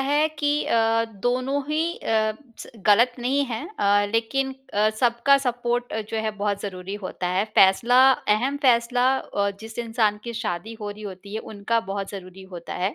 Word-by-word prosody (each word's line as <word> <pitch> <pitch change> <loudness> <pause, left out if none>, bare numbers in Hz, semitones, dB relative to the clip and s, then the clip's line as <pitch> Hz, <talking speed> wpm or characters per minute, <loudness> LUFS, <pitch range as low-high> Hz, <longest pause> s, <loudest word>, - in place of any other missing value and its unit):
है 290 +3 +2
कि 290 -1 +1
अ, 225 0 +2 0.2
दोनों 255 +3 0
ही 305 +1 0 0.2
अ, 220 -1 +1 0.5
गलत 235 +4 +5
नहीं 270 +4 +1
है 235 +4 -4
अ, 205 0 +3
लेकिन 265 +4 0 0.2
अ, 210 +1 +3
सबका 240 +3 +4
सपोर्ट 245 -1 -2
अ, 220 - -1
जो 225 - -2
है 220 - 0
बहुत 200 0 -1
ज़रूरी 190 0 -6
होता 180 -1 -4
है। 185 +3 +1
फैसला 230 +6 +5 0.4
अहम 270 +5 -1
फैसला 245 0 +3
अ, 200 0 -2
जिस 225 +1 -10
इंसान 225 -3 0
की 235 - -5
शादी 210 +3 -4
हो 205 0 -4
रही 210 +1 -10
होती 200 +1 -8
है 220 - -2
उनका 225 +3 0
बहुत 200 -1 -4
ज़रूरी 190 -1 -9
होता 170 - -7
है। 185 +3 -1
225 Hz, 175 wpm, -24 LUFS, 205-245 Hz, 0.5 s, गलत